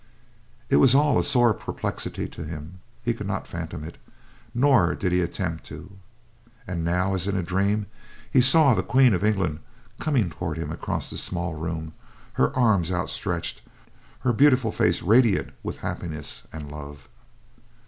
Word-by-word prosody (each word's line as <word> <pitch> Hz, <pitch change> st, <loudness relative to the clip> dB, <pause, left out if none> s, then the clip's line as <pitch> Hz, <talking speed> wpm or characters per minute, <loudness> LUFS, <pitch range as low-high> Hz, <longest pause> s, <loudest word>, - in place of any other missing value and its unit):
It -, -, +3 dB
was 120 Hz, -, +6 dB
all 145 Hz, -1 st, +4 dB
a -, -, +1 dB
sore 120 Hz, -3 st, +5 dB
perplexity -, -, -4 dB
to -, -, -8 dB
him; 80 Hz, +3 st, -8 dB, 0.2 s
he -, -, +1 dB
could -, -, -6 dB
not -, -, -3 dB
fathom 85 Hz, -1 st, -6 dB
it, 80 Hz, -, -9 dB, 0.5 s
nor 120 Hz, -9 st, +3 dB
did 95 Hz, -, -1 dB
he 90 Hz, 0 st, +2 dB
attempt 85 Hz, -2 st, -3 dB
to. 80 Hz, +5 st, -10 dB, 0.7 s
And 90 Hz, -5 st, -4 dB
now, 90 Hz, +3 st, +1 dB
as 95 Hz, 0 st, -1 dB
in 100 Hz, -, -1 dB
a 95 Hz, -, -1 dB
dream, 100 Hz, +4 st, 0 dB, 0.5 s
he 130 Hz, -, +5 dB
saw 135 Hz, +2 st, +6 dB
the -, -, +1 dB
Queen 130 Hz, -3 st, +4 dB
of 90 Hz, +1 st, -1 dB
England 95 Hz, -8 st, 0 dB, 0.4 s
coming 125 Hz, -, +1 dB
toward 80 Hz, 0 st, -4 dB
him 80 Hz, -2 st, -4 dB
across 80 Hz, -, -3 dB
the -, -, -2 dB
small 85 Hz, -2 st, -1 dB
room, 80 Hz, 0 st, -5 dB, 0.4 s
her 65 Hz, -, +2 dB
arms 100 Hz, -8 st, +3 dB
outstretched; 90 Hz, -1 st, -3 dB, 0.6 s
her 120 Hz, -, +1 dB
beautiful 130 Hz, -3 st, +4 dB
face 90 Hz, -4 st, +1 dB
radiant 110 Hz, +1 st, +3 dB
with -, -, -5 dB
happiness 75 Hz, -4 st, -4 dB
and 75 Hz, -2 st, -8 dB
love. 75 Hz, -2 st, -9 dB
90 Hz, 160 wpm, -25 LUFS, 80-115 Hz, 0.7 s, was